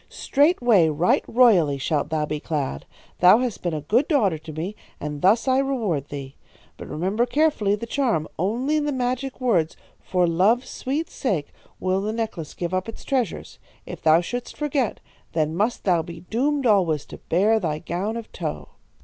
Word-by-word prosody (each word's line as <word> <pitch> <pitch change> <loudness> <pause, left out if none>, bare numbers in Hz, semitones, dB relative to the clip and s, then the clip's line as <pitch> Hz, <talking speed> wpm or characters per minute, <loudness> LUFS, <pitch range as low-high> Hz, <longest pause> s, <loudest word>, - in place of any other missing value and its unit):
"'Straightway, 245 - +3
right 155 +4 +2
royally 195 - +4
shalt 145 +2 -1
thou 155 -1 0
be 150 0 -3
clad. 145 - -3 0.3
Thou 180 +4 +7
hast 245 -3 -2
been 175 -3 -2
a 150 - -3
good 230 - +2
daughter 205 - +2
to 155 - -9
me, 165 +7 -5 0.2
and 150 -1 -5
thus 215 +7 +3
I 260 0 +4
reward 220 - -1
thee. 140 -1 -7 0.4
But - - -10
remember 195 +10 0
carefully 280 -8 +2
the 210 - -6
charm. 230 - 0
Only 250 - 0
to 295 - -2
the 295 - 0
magic 255 +1 -2
words, 185 -11 +1 0.2
"For 180 -1 +1
love's 195 +9 +2
sweet 295 +5 -3
sake," 180 - -2 0.3
will 185 +1 0
the 215 +2 -2
necklace 215 -9 -4
give 175 0 -4
up 185 +4 -1
its 225 - -9
treasures. 250 - -2 0.3
If - - -8
thou 160 +1 +5
shouldst 245 +7 -5
forget, 285 -6 -1 0.3
then 155 -1 0
must 215 +6 0
thou 175 -4 +3
be 170 +1 -9
doomed 270 +9 -1
alway 190 -8 +3
to 145 - -12
bear 210 +6 +2
thy 160 -6 -2
gown 185 +7 -3
of 230 - -8
tow.' - - -5
200 Hz, 180 wpm, -23 LUFS, 160-245 Hz, 0.4 s, Thou